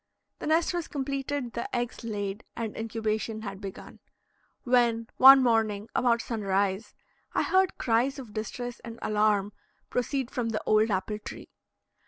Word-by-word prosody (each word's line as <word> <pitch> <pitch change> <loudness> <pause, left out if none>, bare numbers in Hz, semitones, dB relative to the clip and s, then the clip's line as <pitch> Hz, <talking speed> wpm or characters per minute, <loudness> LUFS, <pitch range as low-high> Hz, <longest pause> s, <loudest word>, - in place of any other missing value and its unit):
The - - -5
nest 325 +3 +2
was 345 -2 -2
completed, 275 -2 -3
the 235 +2 -4
eggs 240 0 -3
laid, 205 -2 -4
and 225 -2 -4
incubation 220 0 -2
had 195 -2 -6
begun, 195 -2 -9 0.6
when, 240 -2 +3
one 270 0 +10
morning 220 -3 +1
about 235 -2 +2
sunrise, 200 -2 -1 0.4
I - - +3
heard 375 0 +2
cries 245 +4 +1
of 245 -6 -9
distress 240 +3 -5
and 230 -1 -9
alarm 210 -1 +2 0.4
proceed 250 +1 -1
from 240 -2 -2
the 215 -1 -2
old 215 +1 +4
apple 205 +2 -1
tree. - - -9
230 Hz, 145 wpm, -28 LUFS, 210-250 Hz, 0.6 s, one